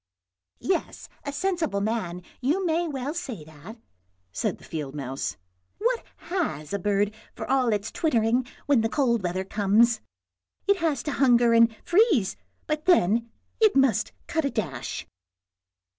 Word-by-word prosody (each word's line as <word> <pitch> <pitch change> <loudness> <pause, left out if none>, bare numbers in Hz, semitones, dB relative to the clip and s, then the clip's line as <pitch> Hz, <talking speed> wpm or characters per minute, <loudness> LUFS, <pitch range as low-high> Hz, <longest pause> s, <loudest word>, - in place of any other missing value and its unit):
" 90 0 -64
Yes, 370 -2 -2 0.2
as 285 0 -4
a - - -4
sensible 340 - 0
man, 200 -5 -2 0.2
you 310 +10 +1
may 335 +1 +1
well 280 -1 -3
say 270 - -5
that," 160 +9 -12 0.5
said - - -1
the - - -19
field 150 -3 -5
mouse. 135 -8 -4 0.2
" 90 - -46
What 475 +2 0 0.3
has 155 - -2
a 200 - 0
bird 205 +2 +1 0.2
for - - -6
all 260 -3 +2
its 205 -1 -1
twittering 240 -4 +1 0.2
when 280 -5 +4
the 225 - 0
cold 235 -5 +2
weather 185 +1 -1
comes? 215 +3 +3 0.6
it 400 0 +4
has 310 -8 0
to 295 - -2
hunger 240 -4 +4
and 230 0 +6
freeze, 350 - +3 0.3
but 305 0 -2
then 235 - +3 0.3
it 435 -7 +5
must 270 -3 +3
cut 320 -1 -1
a 280 - +1
dash." 165 - -4
235 Hz, 160 wpm, -26 LUFS, 200-310 Hz, 0.6 s, and